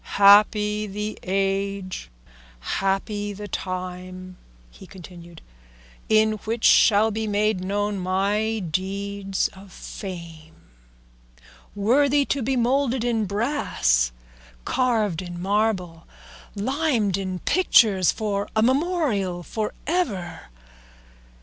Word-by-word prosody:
"Happy 210 +1 +5
the 210 +2 -5
age, 195 - -2 0.5
happy 195 - -2
the 205 +1 -8
time," 185 -1 -6 0.4
he - - -14
continued, 175 -3 -13 0.7
"in 220 0 +4
which 225 +1 -3
shall 215 +1 +5
be 220 +1 -3
made 210 -2 0
known 205 +1 -1
my 200 +4 0
deeds 195 +2 -2
of 190 0 -15
fame, 170 -5 -9 1.2
worthy 275 +7 +3
to 275 - -1
be 265 +3 0
moulded 250 0 +1
in 230 -3 0
brass, 200 - 0 0.5
carved 220 -9 0
in 175 -1 -7
marble, 190 -4 -1 0.5
limned 240 - 0
in 190 -2 -3
pictures, 210 - +4
for 205 -2 -3
a 220 - +3
memorial 255 - 0
for 215 +4 -3
ever. 225 - -2
200 Hz, 100 wpm, -24 LUFS, 185-220 Hz, 1.2 s, Happy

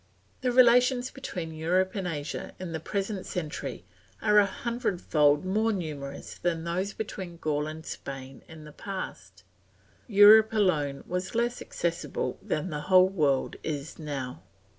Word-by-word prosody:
The 255 -1 +1
relations 250 +1 +5
between 180 -11 -6
Europe 180 +4 +1
and 195 -3 -3
Asia 150 -3 -4
in 185 -2 -5
the 160 - -3
present 195 +3 -3
century 150 -5 -5 0.3
are 210 -1 +5
a 200 - +4
hundredfold 185 - +1
more 215 +4 +1
numerous 150 -8 -5
than 165 -2 -1
those 180 +4 -2
between 190 -5 -6
Gaul 150 -2 -1
and 155 +1 -7
Spain 135 -1 -7
in 160 -1 -11
the 150 - -11
past; 100 - -7 0.6
Europe 215 +1 +8
alone 150 -10 +1
was 180 +4 -3
less 240 +1 0
accessible 165 -7 -3
than 160 +4 -2
the 150 -1 -3
whole 185 0 +7
world 145 -8 +1
is 150 0 -5
now. 135 - -5
175 Hz, 140 wpm, -28 LUFS, 150-205 Hz, 0.6 s, Europe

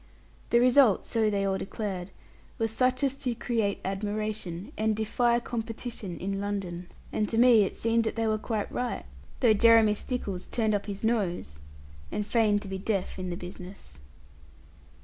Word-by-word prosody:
The 235 - +5
result, 250 -3 +5
so 220 -2 +1
they 200 -1 0
all 190 -1 0
declared, 195 -3 -4 0.5
was 225 -1 0
such 255 +3 +1
as 270 -2 +2
to 255 -4 -2
create 225 -4 -1
admiration, 205 0 -3
and 220 0 +1
defy 235 +2 +2
competition 225 -5 -5
in 195 +1 -3
London. 190 -4 -4 0.3
And 210 -1 0
to 225 - -1
me 240 -2 +7
it - - -5
seemed 230 0 +1
that 220 - -2
they 225 -1 0
were 215 -1 +1
quite 215 -1 -3
right; 245 -1 -3 0.4
though 235 -4 +6
Jeremy 225 0 +6
Stickles 205 -5 -4
turned 220 -2 0
up 205 0 -1
his 200 0 -6
nose, 185 - -1 0.5
and 210 - -2
feigned 210 -2 +2
to - - -8
be 190 0 -4
deaf 195 -1 -2
in 185 -1 -3
the 175 - -3
business. 180 - -10
215 Hz, 170 wpm, -28 LUFS, 195-230 Hz, 0.5 s, me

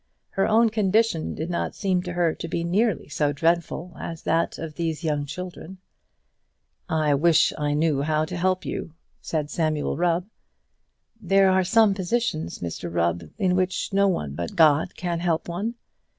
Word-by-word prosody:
Her 195 - +1
own 225 +1 +4
condition 215 -4 +1
did 160 +3 -4
not 170 - -2
seem 185 -3 0
to 180 -1 -5
her 170 -2 +1
to - - -6
be 170 0 -2
nearly 195 - +1
so 150 0 0
dreadful 170 +2 -1
as 165 -1 -6
that 165 +1 0
of 165 -1 -5
all - - -24
these 165 -1 -3
young 150 -2 -1
children. 180 +2 -7 1.1
"I 155 -2 +2
wish 160 +3 +4
I 145 -1 -1
knew 150 -2 +1
how 155 +1 +1
to 180 - -6
help 185 +1 0
you," 165 - -5 0.3
said 150 -2 -3
Samuel 155 -5 -1
Rubb. 175 +1 +1 1.0
"There 195 0 +4
are 190 0 +3
some 215 +2 +4
positions, 190 - -2
Mr 85 0 -5
Rubb, 85 -1 -1
in 185 -2 +2
which 185 +1 -1
no 200 0 +4
one 75 - -1
but 85 +3 -5
God 155 -2 +4
can 175 -2 -2
help 170 -2 0
one. 200 +7 -3
170 Hz, 170 wpm, -24 LUFS, 155-185 Hz, 1.1 s, own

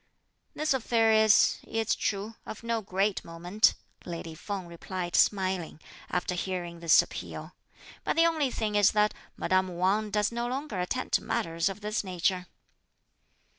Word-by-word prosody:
"This 305 -1 +1
affair 230 -3 +2
is, 220 -1 +5
it's 225 -1 -1
true, 205 +2 -2
of 220 - -8
no 230 -1 -1
great 195 0 0
moment," 175 +6 +1 0.3
lady 170 -1 -6
Feng 195 +3 -5
replied 175 +1 -5
smiling, 185 -5 +2 0.3
after 180 0 -1
hearing 175 -1 -4
this 165 -1 +6
appeal; - - -8 0.5
"but - - 0
the 330 - +5
only 315 -5 +2
thing 215 -3 -2
is 205 -1 +4
that 210 0 +3 0.2
madame 185 -1 0
Wang 200 +4 +1
does 210 +1 +1
no 235 +1 -2
longer 260 -5 -3
attend 220 +8 -2
to - - +2
matters 165 +2 0
of 195 +2 -7
this 210 +1 -1
nature." 180 0 -1
200 Hz, 150 wpm, -29 LUFS, 180-220 Hz, 0.5 s, this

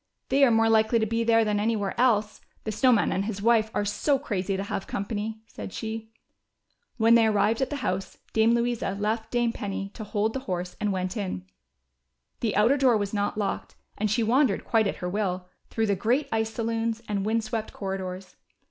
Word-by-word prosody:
" - - -51
They 275 +1 +4
are 270 - +7
more 225 -1 +4
likely 220 +1 +4
to 220 - +2
be 230 +1 0
there 225 -1 +4
than 210 -1 +1
anywhere 210 -2 0
else, 220 -4 +2 0.2
the 215 - -3
Snow 255 +5 +3
Man 225 -4 +3
and 195 - 0
his 205 -2 -4
wife 220 0 +3
are 205 - +1
so 275 +7 +1
crazy 195 -7 -2
to 195 - -2
have 195 -1 -4
company," 215 +2 -4
said 210 - -8
she. 220 0 -5 0.9
When 225 0 +5
they 230 -1 +6
arrived 215 +2 +2
at 265 - +1
the 290 - -3
house. 190 +1 -2 0.2
Dame 225 +1 +4
Louisa 235 -4 -1
left 220 +2 -1
Dame 240 -1 +1
Penny 195 -2 -4
to 220 - -7
hold 210 +1 -1
the 265 - -2
horse, 180 0 -3
and 210 -1 +1
went 185 +1 -2
in. 185 - -4 0.9
The 225 -3 -1
outer 225 +8 +4
door 255 -4 +4
was 205 -1 -3
not 205 0 -1
locked 205 -2 -3 0.2
and 215 0 -1
she 225 +3 +1
wandered 245 0 +2
quite 220 -3 +3
at - - -2
her - - 0
will, 185 -1 -2 0.2
through 225 - 0
the 200 -2 +1
great 240 +9 +1
ice 220 0 0
saloons, 230 0 -2
and 200 -2 -1
wind 220 +2 +1
swept 220 -1 -3
corridors. 190 -1 -5
220 Hz, 210 wpm, -26 LUFS, 200-230 Hz, 0.9 s, are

